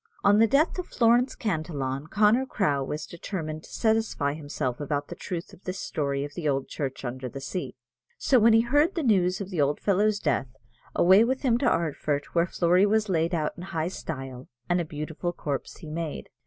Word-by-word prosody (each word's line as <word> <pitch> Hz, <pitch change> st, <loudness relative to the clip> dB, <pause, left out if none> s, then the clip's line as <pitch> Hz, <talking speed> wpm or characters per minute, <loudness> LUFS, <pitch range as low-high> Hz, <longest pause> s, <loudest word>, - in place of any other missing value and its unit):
On 205 Hz, +1 st, +5 dB
the 225 Hz, -, +6 dB
death 300 Hz, -, +2 dB
of 360 Hz, -, -4 dB
Florence 240 Hz, +2 st, +3 dB
Cantillon, 155 Hz, -, -3 dB
Connor 215 Hz, +8 st, +3 dB
Crowe 145 Hz, -, 0 dB
was 150 Hz, +3 st, -4 dB
determined 160 Hz, -3 st, -5 dB
to -, -, -14 dB
satisfy 220 Hz, -11 st, +1 dB
himself 145 Hz, -5 st, -3 dB
about 145 Hz, 0 st, -2 dB
the -, -, -6 dB
truth 175 Hz, -3 st, -6 dB
of 185 Hz, -, -16 dB
this 185 Hz, +1 st, -4 dB
story 140 Hz, -5 st, -2 dB
of 145 Hz, -, -9 dB
the 155 Hz, -3 st, -2 dB
old 135 Hz, -1 st, -1 dB
church 135 Hz, -2 st, -4 dB
under 125 Hz, +1 st, -4 dB
the 135 Hz, -, -7 dB
sea: 175 Hz, +7 st, -5 dB, 0.4 s
so 260 Hz, -, +3 dB
when 225 Hz, +1 st, +6 dB
he 225 Hz, -, +6 dB
heard 290 Hz, +10 st, +2 dB
the 330 Hz, -, -1 dB
news 185 Hz, -6 st, +2 dB
of 195 Hz, 0 st, -6 dB
the 170 Hz, -5 st, 0 dB
old 145 Hz, +1 st, +1 dB
fellow's 205 Hz, +1 st, +2 dB
death, 135 Hz, -, 0 dB, 0.5 s
away 190 Hz, +5 st, +6 dB
with 260 Hz, +4 st, -1 dB
him 240 Hz, -3 st, +3 dB
to 250 Hz, -, +3 dB
Ardfert, 150 Hz, -3 st, -1 dB
where 170 Hz, 0 st, +3 dB
Flory 180 Hz, +3 st, +3 dB
was 215 Hz, 0 st, +1 dB
laid 170 Hz, 0 st, +1 dB
out 155 Hz, -2 st, -1 dB
in -, -, -9 dB
high 165 Hz, -2 st, -2 dB
style, 135 Hz, -8 st, -7 dB, 0.2 s
and 175 Hz, 0 st, +2 dB
a -, -, -3 dB
beautiful 155 Hz, +3 st, -4 dB
corpse 145 Hz, -5 st, -4 dB
he 160 Hz, -, -11 dB
made. 160 Hz, -1 st, -4 dB
170 Hz, 205 wpm, -27 LUFS, 145-215 Hz, 0.5 s, the